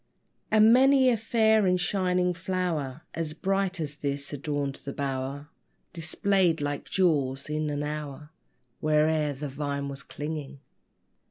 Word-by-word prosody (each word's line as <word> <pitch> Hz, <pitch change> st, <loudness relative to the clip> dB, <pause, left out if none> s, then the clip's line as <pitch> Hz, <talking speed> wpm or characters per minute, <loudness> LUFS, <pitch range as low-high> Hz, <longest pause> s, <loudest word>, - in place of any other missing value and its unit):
And 220 Hz, +1 st, +6 dB
many 265 Hz, +1 st, +6 dB
a 245 Hz, -, +3 dB
fair 220 Hz, -2 st, +3 dB
and 180 Hz, 0 st, +2 dB
shining 180 Hz, -1 st, +1 dB
flower 170 Hz, -6 st, -3 dB
As 160 Hz, -2 st, -3 dB
bright 195 Hz, +1 st, -1 dB
as 150 Hz, -2 st, -4 dB
this 140 Hz, 0 st, -3 dB
adorned 145 Hz, -1 st, -3 dB
the 140 Hz, -, -5 dB
bower, 140 Hz, +1 st, -4 dB, 0.4 s
Displayed 170 Hz, +1 st, +1 dB
like 145 Hz, -1 st, -3 dB
jewels 145 Hz, -7 st, +1 dB
in 155 Hz, 0 st, -1 dB
an 145 Hz, 0 st, -2 dB
hour, 150 Hz, 0 st, -6 dB, 0.5 s
Where'er 155 Hz, 0 st, +2 dB
the 145 Hz, +2 st, -5 dB
vine 140 Hz, 0 st, -3 dB
was 140 Hz, 0 st, -6 dB
clinging. 150 Hz, -2 st, -6 dB
155 Hz, 135 wpm, -27 LUFS, 145-185 Hz, 0.5 s, And